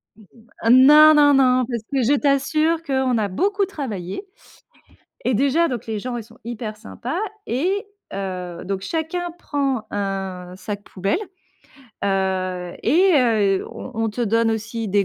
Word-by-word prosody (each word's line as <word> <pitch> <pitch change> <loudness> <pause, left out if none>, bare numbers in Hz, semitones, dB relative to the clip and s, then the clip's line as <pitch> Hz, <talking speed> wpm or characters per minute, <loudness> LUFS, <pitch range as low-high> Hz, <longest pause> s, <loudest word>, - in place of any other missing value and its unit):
Mmh, 220 - -18 0.4
heu - - +4
non, 300 +5 +8
non, 290 -1 +6
non. 255 -2 +4
Parce 235 -3 -2
que 275 -2 +1
je 255 +5 +3
t'assure 310 +4 +1
qu'on 265 -4 0
a 215 -2 +1
beaucoup 390 - 0
travaillé. 260 - -5 1.0
Et 250 - +1
déjà, 280 +8 +2
donc 245 -4 -4
les 220 -1 -3
gens 245 +3 -4
ils 235 - -5
sont 230 +2 -19
hyper 225 -2 -5
sympas 240 +7 -5 0.3
et, 370 +12 -1 0.3
heu, 185 -3 -5
donc 195 0 -3
chacun 330 - -3
prend 275 -8 -2
un 195 -3 -4
sac 205 +2 -6
poubelle, 195 - -1 0.9
heu, 185 -2 -1
et, 370 +5 +4
heu, 215 -8 +2
on - - -9
on 225 +1 0
te 225 +4 -6
donne 230 0 +2
aussi 220 0 -3
des 200 +1 +2
235 Hz, 155 wpm, -22 LUFS, 200-285 Hz, 1.0 s, non